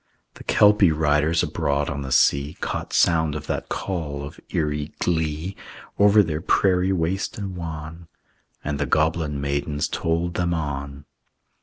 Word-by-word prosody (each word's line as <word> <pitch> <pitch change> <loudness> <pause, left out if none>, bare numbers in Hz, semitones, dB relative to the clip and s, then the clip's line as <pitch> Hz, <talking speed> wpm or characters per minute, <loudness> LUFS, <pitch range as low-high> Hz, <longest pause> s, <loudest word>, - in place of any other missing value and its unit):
The - - -12
Kelpie 105 -4 +5
riders 75 +1 +2
abroad 70 0 -1
on 70 0 -3
the 65 -1 -5
sea 70 +3 +3
Caught - - -4
sound 80 -3 +3
of 75 0 -5
that - - -3
call 75 -7 -3
of 75 +6 -9
eerie 75 -4 -2
glee, 80 +2 -1 0.4
Over 105 +1 +6
their 80 -3 -3
prairie 95 +1 +2
waste 95 +2 -1
and 100 -3 -5
wan; 80 0 -7 0.6
And 70 -1 -3
the 75 - 0
goblin 80 -1 +1
maidens 70 +2 -1
tolled 85 +1 -1
them 85 -1 0
on. 70 -2 -4
80 Hz, 145 wpm, -23 LUFS, 75-85 Hz, 0.6 s, Over